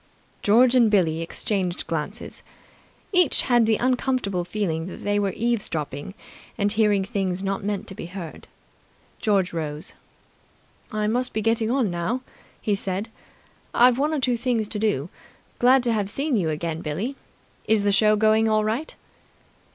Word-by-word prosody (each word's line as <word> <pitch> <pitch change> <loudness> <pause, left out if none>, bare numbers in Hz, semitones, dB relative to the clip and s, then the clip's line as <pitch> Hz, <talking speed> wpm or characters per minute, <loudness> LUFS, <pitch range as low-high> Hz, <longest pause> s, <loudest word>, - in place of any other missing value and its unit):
George 240 +4 +5
and 240 -4 +5
Billie 165 -6 +2
exchanged 180 +1 -2
glances. 165 +6 -5 0.7
Each 360 -6 +3
had 240 -3 +3
the 220 - +4
uncomfortable 250 -7 0
feeling 175 -3 -2
that - - -9
they 205 0 +1
were 200 -1 0
eavesdropping 190 - -2 0.4
and 205 0 +1
hearing 210 -2 +3
things 195 -3 -2
not 195 0 -2
meant 205 -1 -2
to - - -6
be 170 - -7
heard. 175 -3 -8 0.7
George 195 -5 +1
rose. 155 -2 -4 1.0
"I 215 0 -1
must 245 +4 0
be 220 - -1
getting 225 0 +1
along 245 -6 +1
now," 175 +9 -2 0.4
he 210 - 0
said. 195 +2 -2 0.7
"I've 245 +1 +5
one 295 +2 +1
or 310 - 0
two 250 -2 +1
things 230 -3 0
to 210 - -3
do. 195 -8 0 0.5
Glad 255 +1 +5
to 240 -2 +1
have 205 -3 -1
seen 275 +5 -1
you 180 -7 +1
again, 160 +1 -3
Billie. 190 - -3 0.5
Is 220 -2 +3
the 205 - +3
show 215 +1 +4
going 220 +1 +3
all 215 0 +2
right?" 225 +9 -2
210 Hz, 160 wpm, -24 LUFS, 185-235 Hz, 1.0 s, George